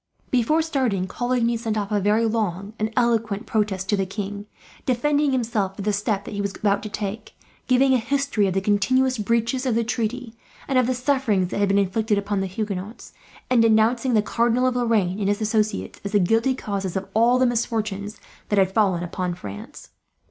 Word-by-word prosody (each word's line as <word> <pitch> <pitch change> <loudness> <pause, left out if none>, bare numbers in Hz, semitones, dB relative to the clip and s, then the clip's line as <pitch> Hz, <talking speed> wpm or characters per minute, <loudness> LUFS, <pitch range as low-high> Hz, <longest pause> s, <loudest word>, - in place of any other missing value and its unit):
Before 265 +6 +2
starting, 260 - 0
Coligny 240 +2 0
sent 225 -2 -2
off 205 0 -3
a 205 - +2
very 210 +3 +2
long 210 -3 -2
and 215 +1 -1
eloquent 230 -3 +1
protest 205 -4 -1
to 210 - +3
the 195 -1 -1
king; 205 +1 -5 0.4
defending 285 +3 +1
himself 220 -6 -1
for 200 - -6
the 210 +1 0
step 205 0 -1
that - - -7
he 205 - -2
was 200 0 -3
about 205 -1 +1
to 215 - -6
take; 210 +1 -5 0.3
giving 265 +1 +4
a 255 - +3
history 275 -4 0
of 185 - -2
the 195 - +1
continuous 235 +6 +2
breaches 230 +4 0
of 240 - +1
the 230 - +2
treaty, 235 +1 -3 0.3
and 265 -2 +2
of 250 - +2
the 255 - 0
sufferings 245 -8 +1
that - - -3
had 200 -1 +2
been 200 - +3
inflicted 210 +2 +1
upon 200 0 -1
the 195 - -1
Huguenots; 205 +2 -5 0.3
and 250 -2 +4
denouncing 230 +2 +3
the 210 - +3
Cardinal 235 +3 +1
of 255 -1 +1
Lorraine 215 -6 +1
and 200 - 0
his 205 0 +1
associates, 215 -1 -1
as 200 +1 -5
the 205 - +5
guilty 225 +8 +2
causes 195 -6 -4
of 190 - -4
all 235 +3 +4
the 255 - +3
misfortunes 220 -4 -2 0.3
that 205 - +1
had 190 -1 +3
fallen 190 -5 +2
upon 180 0 -3
France. 100 - -10
215 Hz, 200 wpm, -23 LUFS, 200-240 Hz, 0.4 s, the